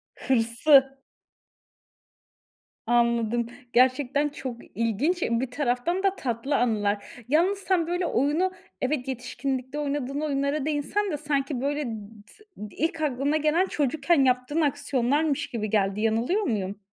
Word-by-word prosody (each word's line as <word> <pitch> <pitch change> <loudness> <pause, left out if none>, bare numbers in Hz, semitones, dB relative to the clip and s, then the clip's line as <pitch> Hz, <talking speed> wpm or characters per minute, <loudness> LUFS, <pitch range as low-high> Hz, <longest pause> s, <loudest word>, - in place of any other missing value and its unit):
Hırsı. 265 +3 +3 1.9
Anladım. 235 -1 +2 0.3
Gerçekten 260 +3 +3
çok 260 -4 -6 0.2
ilginç, 235 - 0
bir 235 0 0
taraftan 280 +7 -1
da 390 -1 +2
tatlı 255 - -2
anılar. 215 -1 -1
Yalnız 340 +9 +3
sen, 365 -4 +1
böyle, 355 +1 -1
oyunu 310 +6 +1 0.3
evet 260 -1 -1
yetişkinlikte 265 +2 -3
oynadığın 285 -1 -2
oyunlara 280 -1 -1
değinsen 310 +7 -1
de 300 - -2
sanki, 280 -3 -1
böyle, 290 +2 -1 0.4
tı - - -14 0.4
ilk 325 +1 -2
aklına 285 +1 +1
gelen 310 +5 +2
çocukken 295 +1 +1
yaptığın 255 +5 +1
aksiyonlarmış 285 0 0
gibi 215 -4 -3
geldi, 200 -1 +1
yanılıyor 230 - +1
muyum? 205 - -2
275 Hz, 115 wpm, -26 LUFS, 240-305 Hz, 1.9 s, Hırsı